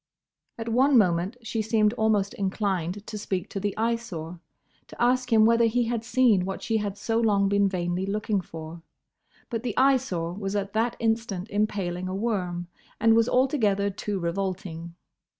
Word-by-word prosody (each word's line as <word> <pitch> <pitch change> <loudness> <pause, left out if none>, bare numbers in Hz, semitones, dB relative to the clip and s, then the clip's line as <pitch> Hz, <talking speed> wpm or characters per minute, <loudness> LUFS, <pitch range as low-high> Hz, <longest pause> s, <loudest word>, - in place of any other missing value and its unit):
At 225 0 -6
one 260 +4 +4
moment 185 +2 +2
she 225 0 -2
seemed 215 -1 +2
almost 215 -4 +1
inclined 195 -1 -2
to 215 - -6
speak 190 -3 -3
to 195 - -3
the 205 0 -3
Eyesore; 220 -8 -3 0.5
to - - -14
ask 250 +1 +2
him 220 -1 +6
whether 230 +1 +4
he 240 +2 +2
had 230 -1 -2
seen 230 -5 +3
what 190 +1 -5
she 225 - +1
had 205 -2 -3
so 225 +2 0
long 205 -3 +3
been 200 0 +3
vainly 180 0 -2
looking 210 0 -1
for. 165 0 -9 0.7
But 230 -2 -2
the 235 -3 -4
Eyesore 255 -11 +2
was 195 +1 -4
at 200 -1 -2
that 230 +2 +1
instant 225 -3 -1
impaling 195 -4 -1
a 185 - -3
worm, 185 -5 -2 0.3
and 225 0 +5
was 230 +1 +3
altogether 215 -7 +2
too 205 +1 -4
revolting. 170 -2 -4
205 Hz, 170 wpm, -26 LUFS, 185-230 Hz, 0.7 s, him